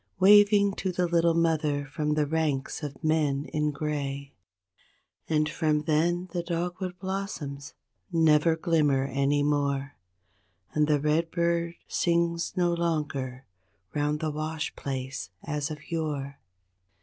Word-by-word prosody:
Waving 205 0 +6
to 190 - -1
the 180 0 0
little 170 -1 +3
mother 155 -4 +1
from 150 +1 -1
the 150 -1 +2
ranks 150 -3 -1
of 145 -3 -7
men 150 -3 +1
in 150 0 +1
gray; 140 -1 -3 1.0
And 155 -1 +2
from 150 -1 0
then 170 +3 +1
the 175 - 0
dogwood 180 +2 -3
blossoms 185 -8 -5 0.4
never 160 -1 +4
glimmer 150 -5 +2
any 140 +1 +1
more, 140 -1 0 0.8
And 150 -1 +2
the 150 -1 +3
redbird 170 +2 0
sings 170 +1 0
no 175 -1 +3
longer 145 -6 -2 0.5
'round 150 0 0
the 155 -1 -1
wash 155 0 -3
place 130 -3 -4
as 150 0 -2
of 155 +2 -9
yore. 145 -4 -3
155 Hz, 125 wpm, -28 LUFS, 145-170 Hz, 1.0 s, Waving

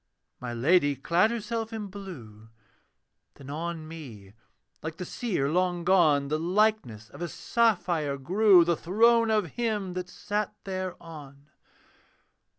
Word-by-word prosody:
My 125 -1 -5
Lady 145 +4 +3
clad 170 - +2
herself 225 0 -3
in 220 -2 -5
blue, 140 - -10 0.9
Then 140 0 -10
on 160 +1 -4
me, 120 -12 -10 0.5
like 160 +1 -6
the 180 - -5
seer 185 - -2
long 175 +2 0
gone, 155 -6 +3
The 155 +1 0
likeness 175 - 0
of - - -12
a 175 - -2
sapphire 175 -10 0
grew, 185 +5 +5
The 170 0 +2
throne 230 +7 +3
of 215 -3 +2
him 210 -6 -2
that 180 0 -5
sat 210 0 -3
thereon. 165 -7 -7
175 Hz, 130 wpm, -27 LUFS, 145-210 Hz, 0.9 s, grew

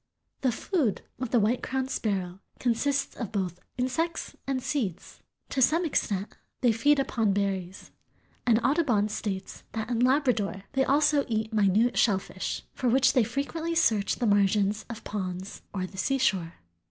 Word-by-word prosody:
The 260 - +2
food 255 - -1 0.2
of 255 -2 -3
the 240 - +3
White 225 +4 +1
crowned 265 0 -2
sparrow 190 -4 -2 0.2
consists 275 +4 0
of 230 -6 -5
both 185 -4 -2 0.2
insects 320 +7 -2
and 270 -1 0
seeds. 215 - -3 0.3
To 265 - -1
some 330 +7 +4
extent 205 - -1 0.3
they 245 -3 +5
feed 285 +7 +3
upon 225 -6 +1
berries, 195 -2 -2 0.5
and 230 -2 +4
Audubon 250 -9 +2
states 200 -2 -4
that 220 +1 -3
in 235 - 0
Labrador 250 -7 +2
they 270 -1 +3
also 290 +1 +3
eat 220 -1 -2
minute 215 +3 +3
shellfish, 190 -3 0
"for 250 - 0
which 260 +3 +4
they 250 - +4
frequently 315 +8 -2
search 215 -10 +2
the 245 - -2
margins 205 0 +2
of 230 -1 -7
ponds 190 -2 -5
or 185 -2 -2
the 190 +1 -9
seashore." 190 -9 +1
225 Hz, 155 wpm, -28 LUFS, 200-265 Hz, 0.5 s, they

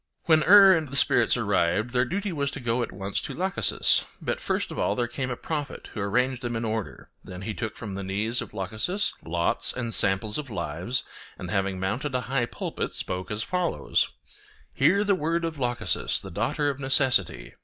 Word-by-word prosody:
When 160 -2 +5
Er 195 0 +9
and 155 -3 -2
the 140 - -6
spirits 140 - +3
arrived, 100 +8 +1
their 125 0 +2
duty 200 +8 -2
was 140 -4 -1
to - - -5
go 120 -1 0
at - - -3
once 100 +1 -3
to - - -6
Lachesis; 190 +2 +2 0.2
but - - -2
first - - -1
of - - -5
all 100 - +1
there 120 0 0
came 130 +2 -3
a 125 - -3
prophet 150 -3 -5
who 110 - -4
arranged 125 +5 +1
them 120 -2 -3
in 115 +1 -2
order; 110 - -4
then 90 +1 -8
he 110 +2 -3
took 105 +3 -5
from 105 -3 -6
the 100 - -4
knees 105 +5 0
of - - -7
Lachesis 110 - -1
lots 85 +1 0
and 120 -2 -3
samples 105 +6 +2
of 145 -3 -6
lives, 90 +4 -2 0.3
and 90 -1 -6
having 95 -2 0
mounted 120 +9 -2
a 125 - +1
high 125 +1 0
pulpit, - - -4
spoke 90 0 -4
as 105 +1 -2
follows: 180 +2 0 0.6
'Hear 180 +9 +4
the 205 -1 +3
word 170 -1 0
of 160 -3 -4
Lachesis, 120 -1 0
the - - -9
daughter 145 -1 0
of 140 - -9
Necessity. 130 - +1
120 Hz, 200 wpm, -26 LUFS, 100-145 Hz, 0.6 s, Er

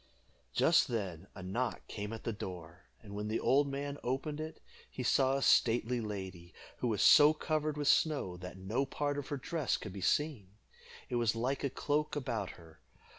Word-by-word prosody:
Just - - +4
then 95 -6 -3
a 95 - -8
knock 120 +7 -2
came 105 0 -5
at 115 - -7
the 115 - -2
door; 90 -3 -8 0.2
and 100 -2 -10
when 105 +1 -3
the 110 +1 0
old 140 +2 +3
man 140 +1 -4
opened 135 +4 -2
it, 155 +1 -6 0.3
he 130 - -5
saw 135 +2 +3
a 135 - 0
stately 120 +1 +3
lady, 95 -5 -6 0.2
who 125 - -1
was 110 -4 +1
so 150 +1 +8
covered 155 -1 -1
with 145 -1 -1
snow 145 - +2
that 90 0 -8
no 105 +8 -1
part 145 +1 -2
of 140 - -6
her 145 - -3
dress 150 +1 -1
could 90 - -8
be 100 - -7
seen. 105 - 0 0.5
It 120 - -1
was 115 -2 +2
like 130 +4 -1
a 140 - +1
cloak 150 +3 -1
about 120 -9 -2
her. 80 -2 -16
120 Hz, 190 wpm, -33 LUFS, 100-145 Hz, 0.5 s, so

